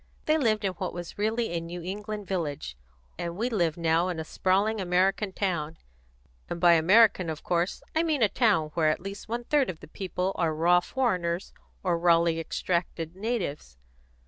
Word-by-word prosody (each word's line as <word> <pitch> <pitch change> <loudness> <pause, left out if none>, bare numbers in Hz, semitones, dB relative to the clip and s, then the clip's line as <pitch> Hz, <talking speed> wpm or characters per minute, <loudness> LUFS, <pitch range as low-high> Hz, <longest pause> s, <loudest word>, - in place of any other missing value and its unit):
They 310 - +3
lived 215 -6 +1
in 190 - +1
what 185 0 -5
was 175 +2 -7
really 225 +2 0
a 170 -1 -2
New 170 +1 -7
England 210 +3 -5
village, 150 - -3 0.4
and 170 0 -4
we 240 +4 -1
live 170 -7 +1
now 165 +1 +2
in 175 -3 -3
a - - -2
sprawling 195 +6 +1
American 190 +3 +1
town; 165 -5 -2 0.7
and 170 - -4
by 175 -1 +6
American 185 +2 +5
of 155 -1 -5
course 175 +1 -1
I 320 - +4
mean 310 -7 +1
a - - +6
town 200 -9 +2
where 160 -2 +2
at 155 - 0
least 195 +3 -8
one 235 +1 -2
third 285 +1 +2
of 165 -4 -5
the - - -12
people 185 +2 -3
are 160 -3 +1
raw 175 +3 +4
foreigners 180 -5 -1 0.3
or 175 -3 +1
rawly 170 -1 +3
extracted 170 0 -2
natives. 190 - -3
180 Hz, 180 wpm, -27 LUFS, 170-210 Hz, 0.7 s, by